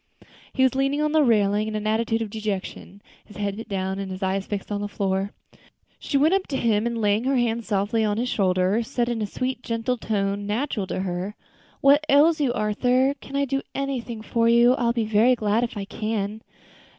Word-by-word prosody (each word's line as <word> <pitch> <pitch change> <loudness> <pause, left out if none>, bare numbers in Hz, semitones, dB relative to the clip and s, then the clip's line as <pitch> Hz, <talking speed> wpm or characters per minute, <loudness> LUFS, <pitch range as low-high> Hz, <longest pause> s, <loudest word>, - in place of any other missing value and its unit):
He 260 - +1
was 260 - +4
leaning 275 +2 0
on 300 0 +1
the 315 0 +4
railing 210 -4 +2
in 215 - -4
an 215 0 -3
attitude 225 +1 0
of 210 - -7
dejection, 205 -1 -5 0.2
his 210 - -14
head 200 -1 -2
bent 225 - -8
down 190 -1 -2
and 195 -1 -4
his 185 +1 -6
eyes 190 +1 -1
fixed 205 0 -5
on 205 0 -2
the 205 - -2
floor. 195 -1 -1 0.7
She 280 - -1
went 305 +6 +4
up 390 -1 +1
to 270 - -2
him, 225 -2 +1
and 235 -1 -2
laying 210 +2 +1
her 270 +1 +2
hand 235 -2 0
softly 210 +2 0
on 210 -1 0
his 245 +2 -1
shoulder, 190 0 +1
said, 240 0 -1
in 235 -2 -2
the 210 - -2
sweet, 255 +3 -3
gentle 230 +2 -2
tones 200 -2 -2
natural 215 -2 -2
to 185 - -3
her. 185 +2 -3 0.5
"What 285 +2 +5
ails 305 +3 +5
you, 270 -4 +2
Arthur? 250 +4 +1
Can 275 - -9
I 280 0 +2
do 275 +1 -1
anything 250 -5 -3
for 230 0 +1
you? 235 +1 +6
I 250 -2 -1
will 235 - +2
be 230 -2 0
very 220 +4 +4
glad 215 0 +1
if 235 -3 -4
I 200 - -4
can." 215 0 -3
225 Hz, 220 wpm, -24 LUFS, 205-250 Hz, 0.7 s, you